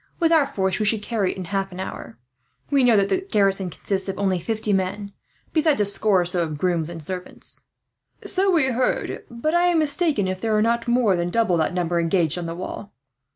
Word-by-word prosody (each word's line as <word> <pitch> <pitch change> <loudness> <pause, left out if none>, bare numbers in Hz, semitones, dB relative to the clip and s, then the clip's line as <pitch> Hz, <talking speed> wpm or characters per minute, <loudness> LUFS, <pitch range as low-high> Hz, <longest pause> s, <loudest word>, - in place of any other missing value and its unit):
With 335 -2 +3
our 310 -4 +4
force 190 -4 -1
we 215 - +1
should 210 0 +2
carry 210 -4 0
it - - -9
in 190 - -4
half 195 +1 -2
an 180 - -9
hour. 115 -10 -7 0.5
We 280 -2 +4
know 240 -3 +5
that 200 0 +2
the 375 - +1
garrison 195 - +1
consists 190 +3 -2
of 195 - -4
only 190 -2 0
fifty 215 +3 -2
men, 195 +2 -2 0.4
besides 310 -5 +2
a 205 - +3
score 200 -1 +2
or - - -1
so 175 0 -1
of 155 -3 -3
grooms 170 -1 0
and 165 -2 -6
servants." 180 +3 -5 0.6
"So 385 +1 +2
we 305 -8 +3
heard; 250 +1 -1
but 240 +6 -2
I 350 +1 +4
am 350 -1 +3
mistaken 300 - +1
if 185 0 -3
there 220 -1 0
were 215 - +3
not 235 +1 0
more 235 -5 +3
than 175 0 -1
double 220 -2 +2
that 160 +2 0
number 175 -1 0
engaged 170 -1 +1
on 170 - -4
the 165 - -5
wall. 185 +3 -7
200 Hz, 225 wpm, -23 LUFS, 180-235 Hz, 0.6 s, know